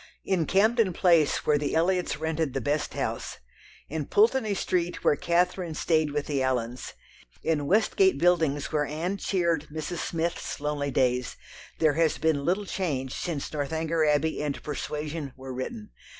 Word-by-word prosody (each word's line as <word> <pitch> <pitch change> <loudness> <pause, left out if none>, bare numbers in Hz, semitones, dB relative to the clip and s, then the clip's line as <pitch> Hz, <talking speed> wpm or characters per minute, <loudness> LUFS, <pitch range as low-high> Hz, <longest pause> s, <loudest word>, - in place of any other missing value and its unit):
In 180 -5 +1
Camden 215 0 +3
Place 165 -5 +3
where 150 -1 +3
the 145 -1 -1
Elliots 180 -1 +1
rented 160 -2 -2
"the - - +1
best 145 +5 -1
house," - - -3 0.5
in 155 -1 -4
Pulteney 220 -1 +3
Street 175 -2 -1
where - - +4
Catherine 175 0 0
stayed 155 -1 +2
with 145 0 -2
the 140 -3 -1
Allens, 125 -2 -2 0.5
in 150 -3 0
Westgate 225 - +3
Buildings 160 -5 +2
where 150 -2 +1
Anne 170 +6 -2
cheered 170 -6 0
Mrs. 160 +2 -4
Smith's 170 0 -3
lonely 145 -1 -2
days, 125 -2 +1 0.4
there 155 -2 +3
has 160 0 +2
been 160 -3 +1
little 190 +4 +1
change 140 -10 -2
since 155 -5 -4
Northanger 160 +2 -1
Abbey 150 +1 +1
and 145 -2 -3
Persuasion 150 -1 -4
were 130 0 -7
written. 210 - -6
160 Hz, 150 wpm, -27 LUFS, 145-175 Hz, 0.5 s, where